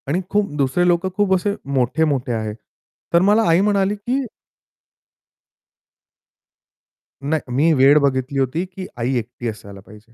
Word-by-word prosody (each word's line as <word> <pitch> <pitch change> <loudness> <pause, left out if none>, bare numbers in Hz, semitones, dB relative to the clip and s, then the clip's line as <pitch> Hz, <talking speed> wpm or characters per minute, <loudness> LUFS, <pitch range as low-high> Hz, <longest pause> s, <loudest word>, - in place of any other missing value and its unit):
आणि 165 +7 0
खूप 205 -3 0
दुसरे 140 +6 +1
लोकं 175 +2 +1
खूप 205 -2 +2
असे 200 +2 -1 0.2
मोठे-मोठे 135 0 0
आहे. 110 -2 -3 0.6
तर 170 - +5
मला 220 +2 +4
आई 165 +3 +4
म्हणाली, 200 0 +1
की 250 +6 -2 3.0
नाही 145 -2 -2
मी 155 +5 +3
वेळ 140 +1 +5
बघितली 135 -1 0
होती, 135 +7 -1
की 185 0 -9
आई 120 +3 -1
एकटी 120 +1 -5
असायला 100 -2 -10
पाहिजे. 105 +3 -17
145 Hz, 135 wpm, -20 LUFS, 125-190 Hz, 3.0 s, तर